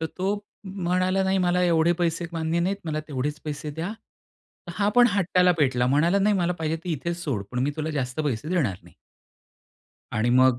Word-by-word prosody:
तर 160 - -1
तो 195 +2 +1 0.3
म्हणाला, 185 0 0
"नाही, 190 0 +2
मला 180 0 +2
एवढे 170 -1 +3
पैसे 170 0 0
मान्य 165 +1 -1
नाहीत, 190 +3 0
मला 155 -1 -2
तेवढेच 145 +2 -3
पैसे 150 0 -4
द्या." 165 +7 -4 0.9
हा 205 0 +2
पण 245 0 +8
हट्टाला 180 -1 +3
पेटला, 125 -4 +2
म्हणाला, 165 +9 +3
"नाही, 205 +1 +3
मला 180 -1 +1
पाहिजे 160 0 -1
ते 180 - -3
इथेच 170 +3 -2
सोड, 115 -10 -2
पण 125 - -2
मी 145 - +1
तुला 155 0 -2
जास्त 135 -1 -2
पैसे 135 +3 -2
देणार 140 - 0
नाही." - - -18 1.2
आणि 110 +2 +1
मग 130 -1 +5
165 Hz, 185 wpm, -25 LUFS, 145-180 Hz, 1.2 s, पण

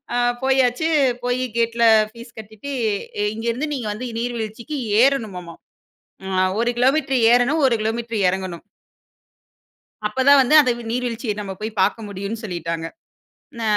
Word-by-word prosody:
அ - - 0 0.3
போயாச்சு. 265 +2 +2 0.4
போயிக் 245 -2 -2
கேட்ல 235 0 0 0.3
ஃபீஸ் 235 +1 -13
கட்டிட்டு, 220 +5 -9 0.6
இங்க 225 +1 -7
இருந்து 260 +7 -2
நீங்க 245 -5 -4
வந்து 245 +4 -6
நீர்வீழ்ச்சிக்கு 235 +3 -4 0.3
ஏறணுமாமா. 205 -11 0 0.7
ம். 190 -1 -3
அ - - +3 0.2
1 235 - +1
கிலோமீட்டர் 265 0 +2
ஏறணும், 250 +6 +3
1 235 - +2
கிலோமீட்டர் 225 0 -2
எறங்கணும். 185 -2 -5 1.4
அப்பதான் 265 +5 +5
வந்து 260 +5 +2
அந்த 255 -4 +2 0.2
நீர்வீழ்ச்சிய 240 -2 -2
நம்மப் 195 -1 -7
போய் 215 0 -5
பாக்க 210 - +1
முடியும்னு 200 +3 -5
சொல்லிட்டாங்க. 170 -3 -4 0.7
ந - - -5
235 Hz, 130 wpm, -21 LUFS, 210-255 Hz, 1.4 s, அப்பதான்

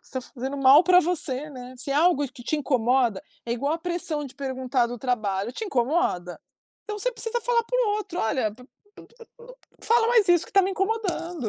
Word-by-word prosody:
Você - - -16
tá 260 - -2
fazendo 265 +2 -6
mal 275 +4 +7
pra 360 +1 +6
você, 300 -5 -2
né. 255 -2 -10
Se 255 +3 -6
é - - 0
algo 295 -2 +3
que 250 -2 -13
te 310 - -1
incomoda 250 -6 +1 0.2
é 235 - -2
igual 280 +5 -1
a 330 - -2
pressão 330 -3 -3
de 265 - -10
perguntar 260 -2 -1
do 240 +1 -7
trabalho. 215 -4 -2
Te 440 - -5
incomoda? 250 - -1 0.4
Então 420 -1 -5
você - - -1
precisa 465 +1 -3
falar 475 0 +1
para - - 0
o - - +1
outro: 405 -4 -5
“Olha, 220 -1 0
p - - -24
p 250 - -15
n 250 - -18 1.1
não - - -9
fala 460 0 +3
mais 455 -6 +4
isso, 350 -2 +4
que - - -18
tá 395 -1 +5
me 380 - 0
incomodando, 370 - -2
290 Hz, 220 wpm, -25 LUFS, 250-370 Hz, 1.1 s, mal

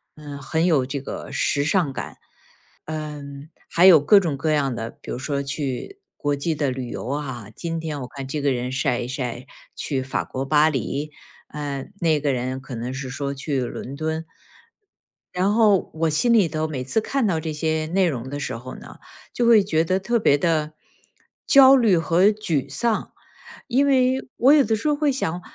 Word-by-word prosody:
嗯， 145 -2 -9
很 160 +5 0
有 150 -7 +3
这 135 +1 -4
个 - - -7
时 140 - +1
尚 160 -2 +1
感。 - - -7 0.7
嗯， 150 -2 -7 0.2
还 170 +2 +4
有 180 -5 +9
各 145 +9 +5
种 165 -7 -2
各 155 +3 -1
样 140 -4 +1
的， 115 0 -4
比 - - -11
如 - - -3
说 140 +2 -2
去 140 - -4 0.2
国 145 0 0
际 150 +4 -1
的 145 -2 0
旅 125 -1 -5
游 - - -6
啊， 130 -6 -4
今 165 -1 -4
天 155 -3 -4
我 125 - -6
看 135 +1 -8
这 145 +2 -3
个 140 -1 +2
人 125 0 -2
晒 130 -2 0
一 120 - -4
晒 125 -1 -5 0.3
去 135 -3 -2
法 135 - -2
国 135 +1 -5
巴 150 +2 +4
黎， 145 +1 -3 0.4
嗯， 145 0 -5
那 160 -4 +2
个 145 -1 0
人 130 +1 -3
可 130 -1 -8
能 120 +3 -4
是 130 0 -5
说 140 +2 -3
去 140 0 -2
伦 125 +2 -6
敦。 160 +2 -3 1.1
然 185 +3 +1
后， 210 -4 +3
我 160 0 0
心 235 +11 +2
里 210 -6 +5
头 155 +1 -2
每 140 -5 -4
次 135 - 0
看 265 +3 -1
到 175 -6 +1
这 160 0 -4
些 155 +1 -1
内 185 +3 +2
容 130 -5 -4
的 145 - -4
时 140 - -4
候 130 +2 -9
呢， - - -12 0.4
就 240 - 0
会 230 -3 +6
觉 160 -5 +1
得 185 +3 +1
特 235 +5 0
别 145 -9 +4
地 155 -1 0 0.7
焦 270 -1 +8
虑 220 -8 +4
和 170 +3 +2
沮 175 -10 0
丧。 220 +11 -1 0.5
因 265 +3 +2
为 260 -1 +2
我 260 +3 +5
有 300 - +6
的 220 -1 +1
时 225 +7 -3
候 295 - +2
会 295 0 +1
想： 180 -10 -2
150 Hz, 215 characters per minute, -23 LUFS, 135-180 Hz, 1.1 s, 有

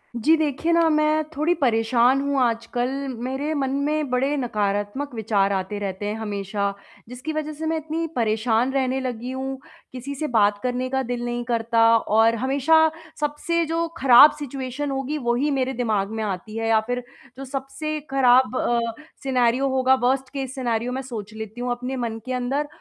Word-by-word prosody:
जी 295 +8 +4
देखिए 315 +2 0
ना, 335 -1 +4
मैं 305 0 +2
थोड़ी 310 +4 +2
परेशान 245 0 +3
हूँ 280 0 0
आजकल 240 +1 0 0.4
मेरे 275 +4 -2
मन 275 -3 -1 0.2
में 300 -1 0
बड़े 265 +3 +1
नकारात्मक 210 +2 -2
विचार 205 -3 +1
आते 190 +2 -3
रहते 195 0 -4
हैं 210 +1 -2
हमेशा, 200 -1 -2 0.4
जिसकी 255 +6 -5
वजह 310 0 -3
से 315 +2 -6
मैं 320 0 0
इतनी 320 +1 -3
परेशान 225 +2 +1
रहने 265 -1 0
लगी 250 -1 -4
हूँ, 265 0 -4 0.3
किसी 260 +3 -6
से 305 +3 -3
बात 210 -4 +3
करने 250 0 -1
का 265 0 0
दिल 245 -1 -3
नहीं 240 0 -2
करता 230 -1 +1
और 225 +1 +3
हमेशा 275 +6 +3 0.4
सबसे 300 +3 0
जो 330 +1 -1
खराब 270 +2 +8
सिचुएशन 275 0 -4
होगी 270 +2 -2
वही 260 +5 +1
मेरे 265 -1 0
दिमाग 220 -5 0
में 220 - -1
आती 210 +2 -4
है 225 0 -1
या 220 -1 +5
फ़िर 245 0 -1 0.3
जो 270 - -6
सबसे 275 +3 -4
खराब 255 -1 +4
अ, 240 0 +1 0.4
सिनेरियो 255 0 +2
होगा, 260 0 +3
वर्स्ट 260 +1 0
केस 265 -1 -4
सिनेरियो 240 -2 -1
मैं 260 +1 -3
सोच 225 -5 -7
लेती 220 +2 -7
हूँ 245 0 -1
अपने 250 +2 -3
मन 230 -3 -3
के 255 - -3
अंदर 260 +4 -1
255 Hz, 175 wpm, -23 LUFS, 230-280 Hz, 0.4 s, खराब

